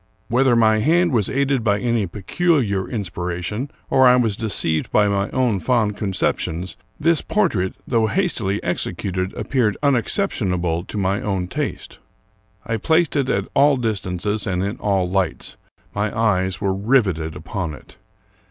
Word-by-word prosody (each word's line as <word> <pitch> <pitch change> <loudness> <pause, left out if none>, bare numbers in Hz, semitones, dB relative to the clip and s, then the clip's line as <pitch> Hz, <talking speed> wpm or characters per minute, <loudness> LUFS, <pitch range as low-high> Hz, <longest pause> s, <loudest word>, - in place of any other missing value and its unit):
Whether 125 +1 +3
my 110 -2 +4
hand 170 +8 +3
was 110 -6 +1
aided 140 -2 0
by 105 -2 +2
any 115 -3 0
peculiar 105 - 0
in 110 -5 -2
spiration, 90 +7 -4 0.2
or 130 -1 +5
I 125 - +7
was 115 -5 +1
deceived 95 -8 -1
by 105 -1 +4
my 100 0 0
own 125 -6 +1
fond 110 -2 +1
conceptions, 90 -3 -2 0.2
this 165 -1 +3
portrait, 115 - 0
though 115 -3 +2
hastily 110 - 0
executed, 95 0 -2
appeared 120 -7 0
unexcep 140 - +1
tionable 90 -5 -1
to - - -6
my 100 0 0
own 95 -3 -2
taste. - - -5 0.7
I 115 -1 -1
placed 160 +8 +2
it 135 -3 +1
at - - 0
all 140 0 +4
distances 105 -3 -2
and 90 -1 -1
in 100 +4 -3
all 95 -3 0
lights; 95 -3 -2 0.4
my 105 +2 -2
eyes 95 -5 +1
were 100 -2 0
riveted 95 - +1
upon 80 -1 -4
it. 70 - -17
105 Hz, 150 wpm, -21 LUFS, 95-125 Hz, 0.7 s, I